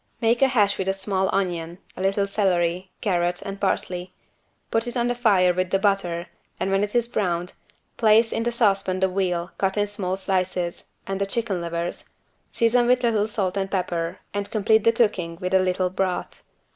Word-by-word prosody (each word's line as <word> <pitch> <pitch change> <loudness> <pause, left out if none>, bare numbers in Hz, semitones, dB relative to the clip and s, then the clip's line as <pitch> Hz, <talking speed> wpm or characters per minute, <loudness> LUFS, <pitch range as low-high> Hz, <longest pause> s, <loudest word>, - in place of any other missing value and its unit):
Make 230 +2 +2
a 270 - +6
hash 205 -5 +2
with 190 - -1
a 195 - +1
small 190 -1 -1
onion, 175 -3 -2 0.2
a - - -6
little 195 +1 +1
celery, 185 -2 0
carrot 175 -4 0
and 195 0 -6
parsley, 180 -2 -2 0.6
put 225 +1 +1
it 240 - -3
on 240 0 +1
the - - +1
fire 200 -7 +3
with 185 0 -1
the 195 - +2
butter 190 -4 0 0.3
and 195 - -1
when 195 +1 +2
it 210 +3 -4
is 240 -1 +3
browned, 180 -6 -1 0.4
place 225 0 +4
in - - -1
the 240 +1 0
saucepan 195 -5 +1
the 190 - +3
veal 180 -2 -1
cut 195 +1 0
in 205 - +3
small 190 -2 -3
pieces 185 -2 -2 0.2
and 195 0 -3
the 200 - +1
chicken 210 -4 -1
livers, 170 0 -4 0.4
season 240 +1 +2
with 250 0 +3
little 220 -3 +2
salt 200 -4 -1
and 195 0 -1
pepper 175 -2 -2 0.2
and 205 0 -3
complete 220 0 +2
the 230 - +6
cooking 200 -8 0
with 185 0 -3
a 190 - +6
little 185 0 0
broth. 185 -1 -2
195 Hz, 195 wpm, -24 LUFS, 180-215 Hz, 0.6 s, a